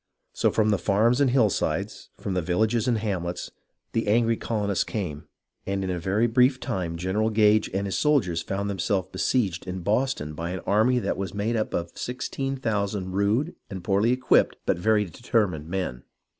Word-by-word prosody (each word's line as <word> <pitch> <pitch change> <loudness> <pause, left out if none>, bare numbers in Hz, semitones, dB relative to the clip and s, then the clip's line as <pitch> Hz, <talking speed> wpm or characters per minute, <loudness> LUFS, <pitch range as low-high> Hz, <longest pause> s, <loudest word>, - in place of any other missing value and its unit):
So - - +2
from 110 -1 +2
the 100 - +1
farms 115 +6 +2
and 140 - +4
hillsides, 120 -6 0
from 95 - -4
the 90 - 0
villages 110 +8 +1
and 120 -2 +2
hamlets, 90 -5 -3 0.4
the 115 -1 -1
angry 115 +2 +3
colonists 105 -4 -1
came, 85 -9 -5 0.4
and 95 0 -1
in 95 - -2
a 90 - -2
very 100 +6 +1
brief 125 +3 +3
time 90 -8 -3
General 95 +5 0
Gage 105 -1 +3
and 100 +1 -1
his 95 - -1
soldiers 115 - +2
found 100 +4 -3
themselves 95 -1 -1
besieged 95 -9 0
in 90 0 -4
Boston 105 - 0
by 85 +3 -4
an 90 +1 -4
army 110 +5 +3
that 125 - -1
was 95 -1 -4
made 105 +3 0
up 110 -1 -1
of 85 0 -3
16,000 115 -7 -2
rude 105 - +1 0.2
and 95 -3 -6
poorly 100 +5 +2
equipped, 130 +1 +3
but - - +1
very 105 +2 +3
determined 95 -5 -1
men. 85 -9 -3
105 Hz, 175 wpm, -25 LUFS, 95-115 Hz, 0.4 s, and